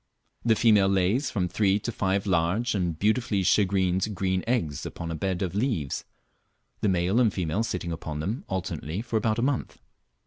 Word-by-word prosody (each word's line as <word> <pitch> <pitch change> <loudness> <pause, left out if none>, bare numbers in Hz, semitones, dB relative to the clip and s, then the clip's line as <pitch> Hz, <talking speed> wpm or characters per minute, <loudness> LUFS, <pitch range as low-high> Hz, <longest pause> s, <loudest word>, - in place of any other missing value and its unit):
The 115 -1 +4
female 105 -4 +5
lays 95 +8 +2
from 95 -5 -1
three 100 +1 +2
to 110 +3 -4
five 95 -2 0
large 95 +6 +1
and 90 -5 -1
beautifully 105 0 +1
shagreened 95 +1 +2
green 95 -1 0
eggs 85 - -1
upon 85 -1 -5
a - - -2
bed 95 +3 -1
of 90 -2 -3
leaves, 100 - -1 0.7
the 105 - +1
male 95 +4 +2
and 115 -4 +4
female 90 +1 -1
sitting 90 -6 -3
upon 80 -2 -5
them 100 - -3
alternately 90 0 -3
for 115 -2 -1
about 110 0 +1
a 120 - 0
month. 135 -1 -1
95 Hz, 175 wpm, -27 LUFS, 90-110 Hz, 0.7 s, female